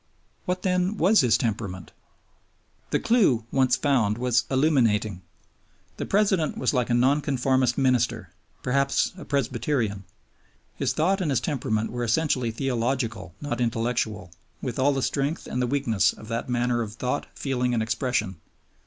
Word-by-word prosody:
What, 180 0 -2
then, 185 +2 +1
was 200 +6 +5
his 120 -4 +3
temperament? 100 -5 -3 1.0
The - - +1
clue 190 - +3
once 130 -2 +3
found 120 -8 +1
was 125 0 +1
illuminating. 115 - +2 0.8
The - - -4
President 195 -6 +1
was 130 - 0
like 125 -2 0
a 120 - +2
Nonconformist 130 -1 +2
minister, 125 -3 +1 0.3
perhaps 140 +2 +1
a 185 - -10
Presbyterian. 120 -6 -1 0.7
His - - 0
thought 190 +5 +1
and 170 - 0
his 135 -4 +2
temperament 115 -6 -2
wore 120 0 -3
essentially 125 0 +1
theological 115 - -2
not 125 -5 -3
intellectual, 115 -5 -1 0.3
with 125 -1 -4
all 140 +2 +4
the 135 -2 -1
strength 145 +3 -1
and 125 - -3
the 125 - +1
weakness 120 -6 +1
of 110 - -13
that 115 +2 -3
manner 120 0 +1
of 110 -2 -5
thought, 125 +1 -2
feeling, 125 -3 -1
and 110 - +1
expression. 115 -4 -1
125 Hz, 145 wpm, -25 LUFS, 115-140 Hz, 1.0 s, was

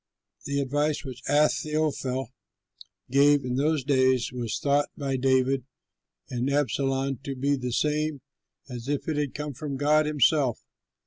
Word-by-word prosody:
The 140 0 -1
advice 145 +3 -1
which 130 -1 -7
Ahithophel 150 -3 +1 0.8
gave 140 0 +4
in 125 - -2
those 150 +1 +1
days 130 -2 +2
was 120 -3 -3
thought 145 0 +1
by 140 -2 -2
David 130 0 +2 0.6
and 125 +1 -2
Absalom 135 -1 0
to 135 -1 -4
be 140 +2 +1
the 125 -2 -4
same 150 +2 0 0.5
as 125 -2 -7
if 145 0 -2
it 155 -2 -1
had 145 -3 -2
come 150 0 -4
from 140 +1 -5
God 150 +2 +3
himself. 145 -3 +2
140 Hz, 140 wpm, -26 LUFS, 130-150 Hz, 0.8 s, gave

